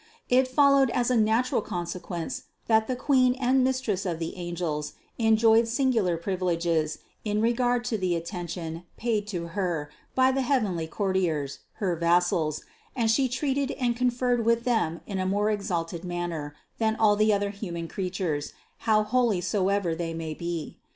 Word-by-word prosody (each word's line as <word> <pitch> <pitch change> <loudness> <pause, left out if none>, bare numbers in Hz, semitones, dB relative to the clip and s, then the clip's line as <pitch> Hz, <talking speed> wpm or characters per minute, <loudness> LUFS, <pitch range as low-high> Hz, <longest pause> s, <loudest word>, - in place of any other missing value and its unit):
It 255 +1 +4
followed 275 0 +4
as 245 +1 +1
a - - +3
natural 225 +2 +2
consequence, 175 -2 -5 0.2
that 220 -1 +3
the 255 - -1
Queen 255 -1 +3
and 260 0 +2
Mistress 255 -7 0
of 175 -4 -2
the 165 0 -4
angels 170 -4 -3 0.3
enjoyed 225 0 +5
singular 230 -8 +1
privileges 170 -3 0 0.3
in 210 -1 0
regard 245 +2 +1
to 230 -3 -1
the 180 -2 +1
atten 175 +1 -4
tion 165 0 -5
paid 215 -3 -1
to 175 -5 -4
Her 165 -5 -2 0.2
by 260 0 +5
the 270 +1 0
heavenly 215 - 0
courtiers, 170 -7 -1
her 185 -4 -1
vassals, 170 -2 +1 0.3
and 230 -3 +2
She 260 +2 +2
treated 275 +2 0
and 245 -3 0
conferred 245 -1 +1
with 230 +1 +2
them 220 -10 0
in 195 -2 -4
a 185 - 0
more 205 +2 +1
ex 205 -2 -3
alted 170 -1 -2
manner, 175 -4 -4 0.2
than 220 -1 +2
all 215 -2 +4
the 215 +1 +3
other 200 0 +1
human 175 -5 -5
creatures, 180 -6 -3 0.4
how 215 -1 +5
holy 230 -3 +2
so 185 +2 0
ever 200 -4 +1
they 165 0 -3
may 160 -1 -4
be. 170 0 -5
200 Hz, 165 wpm, -27 LUFS, 170-240 Hz, 0.4 s, enjoyed